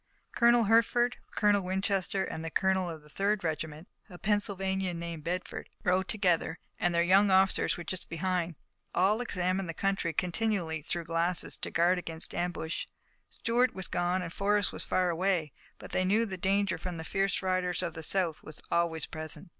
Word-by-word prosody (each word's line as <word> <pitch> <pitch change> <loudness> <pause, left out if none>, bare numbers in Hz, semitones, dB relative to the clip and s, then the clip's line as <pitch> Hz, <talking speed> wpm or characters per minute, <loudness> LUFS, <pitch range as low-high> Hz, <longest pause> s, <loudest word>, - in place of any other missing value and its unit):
Colonel 235 0 +5
Hertford, 230 +3 +3
Colonel 205 -1 +3
Winchester, 190 0 -1
and 160 - -5
the 165 - -3
colonel 190 +1 +1
of 160 -2 -8
the - - -16
third 200 +5 0
regiment, 155 +1 -3 0.2
a 180 - -10
Pennsylvanian 195 -3 -1
named 170 -2 -5
Bedford, 180 +3 -4
rode 185 +1 +2
together 180 -5 +1 0.2
and 175 -1 +1
their 170 - +4
young 195 +3 +5
officers 190 0 +3
were 175 - -6
just 185 0 -5
behind. 175 0 -1 0.4
All 200 +6 +3
examined 185 -4 -1
the 165 - -4
country 195 -4 0
continually 180 -2 -1
through 170 +3 -3
glasses 170 +2 0
to - - -3
guard 175 +2 +3
against 165 -2 -1
ambush. 170 -2 -3 0.4
Stuart 245 +2 +1
was 190 -2 -5
gone 175 +1 0
and 170 -1 -6
Forrest 205 0 +2
was - - -1
far 180 -1 +1
away, 170 -3 0 0.3
but - - -11
they 185 - +1
knew 210 +5 +3
that 190 -4 -6
danger 200 +1 +1
from 180 -2 -5
the 160 - -5
fierce 195 +3 0
riders 185 -1 +1
of 170 - -2
the 160 - -7
South 170 -1 +1
was 155 - -11
always 165 -2 +1
present. 155 +3 -6
185 Hz, 180 wpm, -30 LUFS, 170-195 Hz, 0.4 s, Colonel